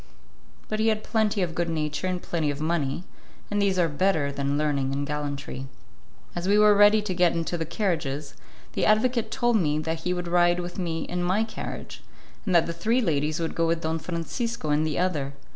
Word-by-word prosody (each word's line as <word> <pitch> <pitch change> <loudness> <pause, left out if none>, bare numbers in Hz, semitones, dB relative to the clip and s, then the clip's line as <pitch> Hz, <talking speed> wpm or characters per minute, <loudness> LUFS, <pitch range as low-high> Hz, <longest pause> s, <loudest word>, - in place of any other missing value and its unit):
But 215 - -2
he 220 - +2
had 215 -1 +1
plenty 215 -3 +1
of 170 -2 -2
good 175 0 -1
nature 155 +1 -2
and 180 -1 -1
plenty 160 -4 -1
of 145 0 -3
money, 155 -1 -1 0.5
and 205 0 +1
these 195 -2 +2
are 175 -2 +3
better 160 -2 +1
than 140 0 -1
learning 140 -3 0
and 140 +1 -1
gallantry. 145 -2 -4 0.7
As 175 +1 -3
we 205 +1 +4
were 210 0 +7
ready 205 +1 +6
to 200 -3 -2
get 175 -1 +3
into 165 +1 -2
the 165 -2 -3
carriages, 155 -6 -2 0.4
the - - -1
advocate 225 +1 +3
told 240 0 +2
me 150 -6 +1
that 160 +1 -2
he 180 +2 -2
would 180 -1 -3
ride 175 0 +3
with 175 +1 -5
me 165 -3 -2
in 180 0 -3
my 185 +5 +2
carriage, 225 - -7 0.5
and 185 - +2
that 170 - +5
the 170 - -3
three 220 +9 +1
ladies 155 - 0
would 165 -1 -2
go 165 0 +1
with 165 0 0
Don 160 0 -1
Francisco 175 - -3
in 150 +1 +2
the 155 -2 -1
other. 150 -7 0
170 Hz, 210 wpm, -26 LUFS, 150-195 Hz, 0.7 s, were